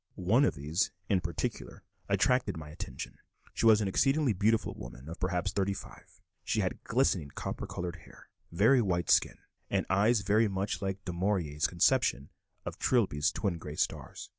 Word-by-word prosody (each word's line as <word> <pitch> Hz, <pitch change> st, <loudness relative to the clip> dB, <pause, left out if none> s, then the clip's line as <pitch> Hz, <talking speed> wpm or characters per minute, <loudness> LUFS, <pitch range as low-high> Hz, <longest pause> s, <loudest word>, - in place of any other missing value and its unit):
One 110 Hz, +10 st, +3 dB
of -, -, 0 dB
these 75 Hz, +7 st, 0 dB, 0.2 s
in 95 Hz, -3 st, +2 dB
particular 85 Hz, -1 st, -4 dB, 0.3 s
attracted 125 Hz, -8 st, +2 dB
my 75 Hz, -1 st, -8 dB
attention; 75 Hz, -, -7 dB, 0.3 s
she -, -, +2 dB
was 110 Hz, -1 st, +6 dB
an 100 Hz, -, 0 dB
exceedingly 135 Hz, +5 st, +2 dB
beautiful 105 Hz, +3 st, +1 dB
woman 60 Hz, +3 st, -10 dB
of 85 Hz, +2 st, -8 dB
perhaps 90 Hz, +1 st, -1 dB
thirty 100 Hz, 0 st, 0 dB
five; -, -, -12 dB, 0.2 s
she -, -, 0 dB
had -, -, -3 dB
glistening 100 Hz, -, +1 dB
copper -, -, -4 dB
colored 90 Hz, 0 st, -5 dB
hair, 85 Hz, -, -17 dB, 0.2 s
very 110 Hz, +9 st, +4 dB
white 85 Hz, -5 st, 0 dB
skin, -, -, +3 dB, 0.3 s
and -, -, 0 dB
eyes 105 Hz, +4 st, +3 dB
very 105 Hz, +3 st, +3 dB
much 100 Hz, +1 st, -2 dB
like 95 Hz, 0 st, -4 dB
Du 90 Hz, -, -4 dB
Maurier's 85 Hz, -5 st, 0 dB
conception 90 Hz, -, +2 dB, 0.3 s
of -, -, -6 dB
Trilby's 80 Hz, -, +2 dB
"twin 90 Hz, -3 st, -2 dB
gray 75 Hz, -2 st, -7 dB
stars." -, -, -3 dB
95 Hz, 165 wpm, -30 LUFS, 85-110 Hz, 0.3 s, was